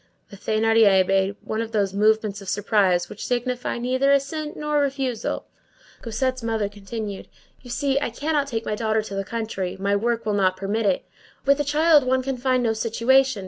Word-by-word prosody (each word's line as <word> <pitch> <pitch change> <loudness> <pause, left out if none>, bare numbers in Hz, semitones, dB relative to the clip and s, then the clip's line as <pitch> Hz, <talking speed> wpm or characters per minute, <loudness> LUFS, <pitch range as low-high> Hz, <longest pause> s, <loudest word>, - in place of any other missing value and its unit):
The - - -9
Thénardier 215 -2 +3
made 195 +1 +1
one 220 +1 -2
of 225 0 -6
those 200 -3 +1
movements 215 0 +1
of 195 - -7
surprise 195 -4 +2
which 210 - -9
signify 250 0 -2
neither 260 +3 +1
assent 300 +2 -1
nor 300 0 0
refusal. 270 -5 -2 0.6
Cosette's 255 +3 -2
mother 225 -2 -1
continued:— 205 0 -7 0.3
"You 245 - -13
see, 275 +2 0
I 285 - -2
cannot 290 +4 -1
take 230 -4 -3
my - - -2
daughter 220 0 0
to 205 - -8
the 195 0 -2
country. 205 -4 -4
My 200 +1 +1
work 230 +2 -1
will 210 - 0
not 185 -2 +2
permit 205 +3 -1
it. 190 - 0 0.4
With 280 +1 +4
a - - +2
child 300 +1 +4
one 260 0 +1
can 270 0 -3
find 255 0 +1
no 225 -1 +2
situation. 235 +2 +2
225 Hz, 185 wpm, -23 LUFS, 205-260 Hz, 0.6 s, With